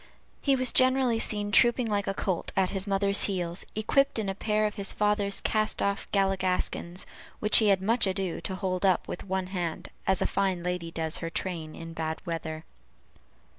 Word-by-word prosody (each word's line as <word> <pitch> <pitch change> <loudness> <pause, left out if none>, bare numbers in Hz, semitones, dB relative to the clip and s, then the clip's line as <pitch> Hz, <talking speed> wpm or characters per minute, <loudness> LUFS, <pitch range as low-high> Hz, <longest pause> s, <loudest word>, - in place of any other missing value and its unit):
He 275 -2 +3
was 255 -1 +3
generally 255 -2 +4
seen 205 -2 +1
trooping 240 +4 +4
like 205 -2 -1
a 195 - -1
colt 185 -3 -2
at 190 -1 +2
his 195 0 -2
mother's 200 0 +3
heels, 180 -3 -2
equipped 275 +6 +1
in 210 -3 -2
a - - -1
pair 215 +2 0
of 210 - -1
his 200 -2 +1
father's 205 -1 +2
cast 215 -1 0
off 200 0 -2
galligaskins, 190 -2 -1 0.3
which 210 - +5
he 220 - +2
had 195 -2 +3
much 225 +1 +2
ado 190 -2 -2
to 190 - -4
hold 185 -1 -3
up 190 -2 +2
with - - -6
one 190 -1 -2
hand, 175 -3 -4 0.2
as 190 -1 +3
a - - +1
fine 190 -3 -1
lady 180 -1 -3
does 160 -1 -2
her 165 - -4
train 165 -3 -4
in 165 0 -9
bad 160 -1 -3
weather. 160 -2 -5
195 Hz, 190 wpm, -28 LUFS, 180-210 Hz, 0.3 s, which